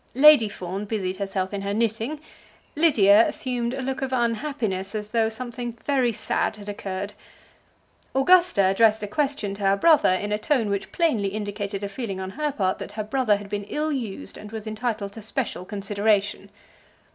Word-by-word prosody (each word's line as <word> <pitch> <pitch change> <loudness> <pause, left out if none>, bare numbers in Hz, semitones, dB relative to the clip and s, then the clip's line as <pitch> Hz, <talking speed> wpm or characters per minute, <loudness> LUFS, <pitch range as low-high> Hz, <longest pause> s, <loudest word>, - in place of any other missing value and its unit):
Lady 280 -5 +7
Fawn 190 +1 -5
busied 190 -3 -2
herself 195 -1 -3
in 200 - -3
her 200 +1 -2
knitting. 230 +6 -1 0.6
Lydia 225 -9 +6
assumed 245 -1 -2
a 265 - -4
look 265 +1 -3
of 265 -1 -2
unhappiness, 230 -5 -1
as 210 -1 -4
though 225 -2 +2
something 240 +1 -5
very 260 -4 +2
sad 215 - -1
had 205 -1 -12
occurred. 200 0 -5 1.0
Augusta 345 - +5
addressed 215 +3 +3
a - - -2
question 270 -3 -1
to 200 - -9
her 195 0 +3
brother 310 +5 +5
in 190 +3 0
a 210 - 0
tone 230 -1 +1
which 200 -1 -3
plainly 270 - +1
indicated 205 0 -4
a - - -1
feeling 200 -2 -5
on 190 0 -5
her 300 +5 -2
part 190 -7 -1
that - - -7
her 215 0 -3
brother 230 -1 +2
had 205 0 -9
been 205 0 -4
ill 305 +8 -2
used 235 -9 -5
and 210 - -10
was 220 -1 -6
entitled 215 -2 -3
to 225 - -9
special 220 -4 -3
consideration. 205 +1 0
215 Hz, 180 wpm, -24 LUFS, 200-255 Hz, 1.0 s, Lady